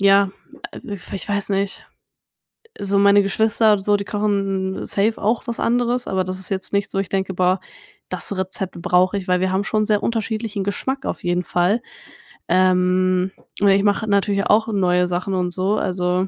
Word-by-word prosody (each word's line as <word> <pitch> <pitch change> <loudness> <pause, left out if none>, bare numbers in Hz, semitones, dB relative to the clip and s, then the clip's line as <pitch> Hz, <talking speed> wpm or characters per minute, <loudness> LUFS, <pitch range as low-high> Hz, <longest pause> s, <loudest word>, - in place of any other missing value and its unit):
ja, 195 0 +5 0.5
ich 195 -2 -7
w - - -17
weiß 205 -1 0
nicht, 195 0 -2 0.9
so 200 0 +3
meine 200 0 +6
Geschwister, 215 +1 +2
so, 205 +2 +2
die 200 - -5
kochen 195 -2 -1
safe 210 +3 +1
auch 220 +3 0
was 235 - -3
anderes, 245 +1 0
aber 190 -1 0
das 185 +1 -4
ist 190 - -6
jetzt 190 0 -3
nichts, 200 +1 -1
wo 195 - 0
ich 195 - -3
denke: 190 -1 -1
„Boah, 185 +1 +2 0.5
das 200 - -3
Rezept 190 -1 -3
brauche 180 +3 +2
ich“, 190 - -6
weil 180 0 +2
wir 185 0 +1
haben 190 +1 0
schon 215 +1 +1
sehr 210 -1 +1
unterschiedlichen 220 -2 -2
Geschmack 265 +7 -3
auf - - -4
jeden 175 0 0
Fall. 180 +7 +1 0.7
Ähm, 185 0 +2 0.3
oder 200 -1 +5
ich 195 - +2
mache 205 +2 +1
natürlich 200 -1 +1
auch 220 +2 +3
neue 180 -4 +2
Sachen 180 +2 -2
und 180 -1 -1
so, 190 +3 0
also, 180 0 0
195 Hz, 180 wpm, -21 LUFS, 185-205 Hz, 0.9 s, meine